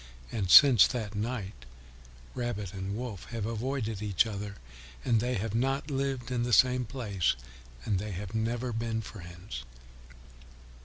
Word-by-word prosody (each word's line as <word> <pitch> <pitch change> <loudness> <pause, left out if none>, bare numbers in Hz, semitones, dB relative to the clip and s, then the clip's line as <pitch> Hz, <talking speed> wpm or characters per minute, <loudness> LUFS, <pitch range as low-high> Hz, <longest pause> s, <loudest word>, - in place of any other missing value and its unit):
And 95 -5 -2
since 125 -1 +9
that 110 -5 -4
night 105 -2 -3 0.8
Rabbit 105 -6 -3
and 95 +1 -4
Wolf 120 -6 -6
have 115 -3 -4
avoided 115 -2 -2
each 105 0 +2
other, 105 -2 -5 0.5
and 115 -3 +3
they 125 +3 0
have 105 +2 -2
not 135 +5 0
lived 135 -3 -2
in 125 -1 0
the 120 0 -1
same 125 +1 +5
place, 105 -7 0 0.5
and 100 -4 +1
they 105 +2 -4
have 95 +1 -6
never 115 +3 -1
since 115 -1 -3
been 115 -1 -1
friends. 85 - -8
110 Hz, 150 wpm, -30 LUFS, 100-125 Hz, 0.8 s, since